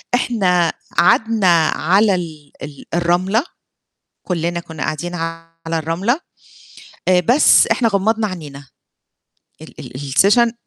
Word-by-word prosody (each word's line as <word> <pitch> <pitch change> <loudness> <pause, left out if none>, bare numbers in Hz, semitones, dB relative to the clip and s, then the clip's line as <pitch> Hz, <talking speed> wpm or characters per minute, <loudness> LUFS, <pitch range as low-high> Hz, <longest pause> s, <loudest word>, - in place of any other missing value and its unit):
إحنا 180 -9 +1 0.2
قعدنا 185 -5 +3
على 195 +4 +2
ال 155 -4 -7
ال 145 -1 -10
الرملة 180 - +1 0.8
كُلّنا 170 -1 -2
كنا 160 -2 -7
قاعدين 165 +4 -4
على 165 0 -6 0.3
الرملة 180 - -1 0.9
آآ، 180 -1 +4
بس 245 - +4
إحنا 235 -3 +1
غمّضنا 215 +2 0
عنينا. 145 -7 -9 0.9
ال - - -13
ال - - -10
الsession 200 - +2
175 Hz, 105 wpm, -18 LUFS, 165-205 Hz, 0.9 s, آآ